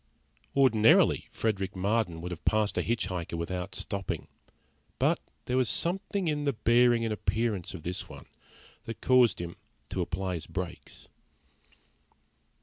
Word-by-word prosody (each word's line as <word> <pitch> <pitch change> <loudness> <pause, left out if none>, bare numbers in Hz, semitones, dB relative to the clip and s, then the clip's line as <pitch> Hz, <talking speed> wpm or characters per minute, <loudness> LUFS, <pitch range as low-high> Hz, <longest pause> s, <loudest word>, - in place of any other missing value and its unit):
Ordinarily 115 -5 +5
Frederick 100 -4 -2
Marden 95 -3 0
would 90 +1 -5
have 85 - -7
passed 110 -1 +2
a - - +1
hitch 120 0 0
hiker 85 -2 -4
without 90 +3 -4
stopping, 100 -2 -2 0.7
but - - +2 0.3
there 125 - 0
was 130 -3 +2
something 195 +1 -1
in 150 -1 0
the 140 -1 +1
bearing 120 +1 +4
and 110 - 0
appearance 105 -1 -1
of 80 - -9
this 90 +1 -4
one - - -11 0.6
that 115 - -6
caused 125 -5 +4
him 85 -1 -6 0.3
to - - -2
apply 95 +1 -2
his 80 -3 -5
brakes. 90 -1 -7
105 Hz, 145 wpm, -29 LUFS, 90-120 Hz, 0.7 s, Ordinarily